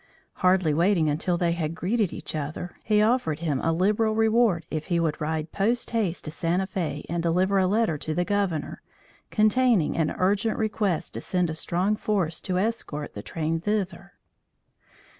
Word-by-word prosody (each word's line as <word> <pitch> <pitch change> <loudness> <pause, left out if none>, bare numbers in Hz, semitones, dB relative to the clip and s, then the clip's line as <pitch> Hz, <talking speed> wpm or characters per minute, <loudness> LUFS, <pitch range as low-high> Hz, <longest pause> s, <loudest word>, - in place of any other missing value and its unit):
Hardly 185 -4 +3
waiting 170 0 +3
until 175 +4 0
they 170 -1 +1
had 165 -1 -2
greeted 200 +2 0
each - - -5
other, 155 +4 -4
he 210 -1 +3
offered 220 - +1
him 155 -4 -1
a 165 - +1
liberal 210 +6 +2
reward 220 -6 +3
if 155 -1 -3
he 175 -2 0
would 165 -1 -1
ride 155 +1 -2
post 230 +5 0
haste 210 -7 -1
to 155 - -5
Santa 175 +4 0
Fe 170 -6 -4
and 170 0 -2
deliver 185 +4 +2
a 185 - +3
letter 205 -6 +1
to 155 +1 -3
the 175 - +1
Governor, 200 -6 -1 0.5
containing 215 -4 +3
an 160 -2 +1
urgent 205 +4 +1
request 210 -5 -1
to - - -5
send 180 -3 0
a - - -3
strong 180 +6 0
force 195 -7 -1
to 180 -1 -2
escort 185 -8 -2
the 105 - -6
train 160 +7 -2
thither. 195 -2 -2
180 Hz, 175 wpm, -26 LUFS, 165-210 Hz, 0.5 s, Hardly